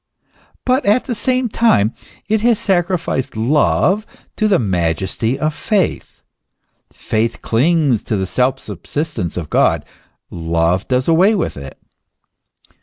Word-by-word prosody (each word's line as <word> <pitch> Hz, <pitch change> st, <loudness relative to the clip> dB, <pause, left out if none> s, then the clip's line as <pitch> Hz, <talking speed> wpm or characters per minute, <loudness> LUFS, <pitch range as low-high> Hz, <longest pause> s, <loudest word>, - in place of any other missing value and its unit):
But 255 Hz, +2 st, +2 dB
at 215 Hz, +5 st, +3 dB
the 250 Hz, -, -2 dB
same 255 Hz, +2 st, 0 dB
time 125 Hz, -, +2 dB, 0.3 s
it 215 Hz, +1 st, +1 dB
has 235 Hz, -1 st, +3 dB
sacri 180 Hz, -2 st, +1 dB
ficed 135 Hz, -6 st, -3 dB
love 150 Hz, -, +2 dB, 0.3 s
to 215 Hz, -, +1 dB
the 200 Hz, -3 st, +4 dB
majesty 95 Hz, -, -1 dB
of 155 Hz, 0 st, -1 dB
faith. 200 Hz, +2 st, -2 dB, 0.7 s
Faith 110 Hz, +1 st, -2 dB
clings 140 Hz, -1 st, +2 dB
to 110 Hz, -, -1 dB
the 95 Hz, -, -1 dB
self 130 Hz, +7 st, 0 dB
sub 100 Hz, -9 st, -9 dB
sistence 145 Hz, -, -3 dB
of 85 Hz, -4 st, -5 dB
God; -, -, +2 dB, 0.5 s
love 85 Hz, +2 st, 0 dB
does 130 Hz, 0 st, 0 dB
away 180 Hz, +6 st, +4 dB
with 185 Hz, -, -2 dB
it. 70 Hz, -2 st, -9 dB
135 Hz, 135 wpm, -17 LUFS, -, 0.7 s, the